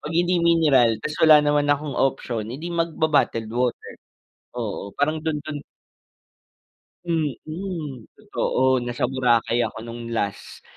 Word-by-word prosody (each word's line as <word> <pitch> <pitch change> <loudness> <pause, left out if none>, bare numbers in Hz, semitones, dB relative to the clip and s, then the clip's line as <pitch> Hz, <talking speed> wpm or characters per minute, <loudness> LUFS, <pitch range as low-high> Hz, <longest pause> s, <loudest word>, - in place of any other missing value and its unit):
'Pag 150 - -5
hindi 175 +1 +2
mineral, 140 -10 +4
tapos 150 - -4
wala 155 -1 +9
naman 145 0 +2
akong 145 0 -1
option, 120 -4 -1
edi 150 +8 -6
magba-bottled 160 -8 +1
water. 125 0 -1 0.7
Oo, 100 -3 -4
parang 155 +2 +1
do'n 160 -2 -1
do'n 155 -1 -5 1.5
Mm. 155 - -4
Totoo, 130 0 0
nasa 120 0 -3
Boracay 120 -3 +2
ako - - -7
no'ng 115 0 -7
last 100 -3 -4
145 Hz, 125 wpm, -23 LUFS, 120-155 Hz, 1.5 s, wala